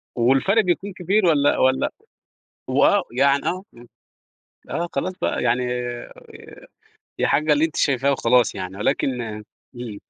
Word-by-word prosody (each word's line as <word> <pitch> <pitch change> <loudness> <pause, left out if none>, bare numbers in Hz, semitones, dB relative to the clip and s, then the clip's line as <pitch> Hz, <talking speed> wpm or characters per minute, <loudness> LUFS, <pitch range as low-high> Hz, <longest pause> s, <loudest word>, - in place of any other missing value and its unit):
والفرق 135 - +3
بيكون 190 +2 -1
كبير، 190 +3 +1
والَّا 145 -4 +3
والَّا 130 0 +2 0.8
و - - +3
آه، - - +3
يعني 140 +1 +3
آه، 185 +2 -2 1.1
آه، 170 - -2
خلاص 185 - -2
بقى - - -1
يعني 125 +1 +1 1.6
يا - - +2
حاجّة 150 +1 +2
اللي 150 +2 +3
أنتِ 160 -1 -3
شايفاه 140 0 +2
وخلاص، 125 -2 +2
يعني 95 +1 -6
ولكن 130 +2 0 0.5
إمم. 120 -4 -7
140 Hz, 130 wpm, -22 LUFS, 125-175 Hz, 1.6 s, والفرق